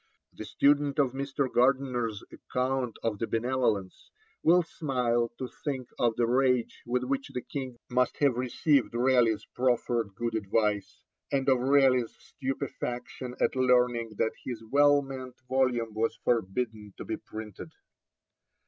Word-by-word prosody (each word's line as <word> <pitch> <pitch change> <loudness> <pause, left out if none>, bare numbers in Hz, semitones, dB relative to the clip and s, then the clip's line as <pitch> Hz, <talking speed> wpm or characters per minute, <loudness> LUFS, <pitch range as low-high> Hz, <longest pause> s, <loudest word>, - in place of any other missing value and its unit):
The - - -8
student 145 0 +2
of 140 -4 +3
Mr. 135 +1 -2
Gardiner's 125 -4 +1
account 125 -2 -2
of 110 -3 -1
the 115 - -1
Benevolence 115 -5 -1 0.3
will 175 +2 +5
smile 125 -7 0
to 130 - -4 0.2
think 130 -4 -3
of 120 -2 +2
the 120 - +2
rage 125 0 +1
with 125 +1 0
which 135 +1 -2
the 125 - -3
King 130 -4 -6
must 125 0 +1
have 140 -3 +3
received 130 +1 +1
Raleigh's 120 -3 +3
proffered 120 -4 0
good 115 +2 -2
advice, 105 -1 -1 0.3
and 135 -1 0
of 130 -2 +4
Raleigh's 130 -2 +3
stupefaction 130 -2 -5
at - - +1
learning 125 -3 +2
that 110 - +1
his 120 -3 -5
well 145 0 +5
meant 130 -2 -8
volume 125 -4 +1
was 110 +1 0
forbidden 110 -1 -1
to - - -7
be - - -3
printed. 110 -2 -9
125 Hz, 140 wpm, -29 LUFS, 115-135 Hz, 0.3 s, will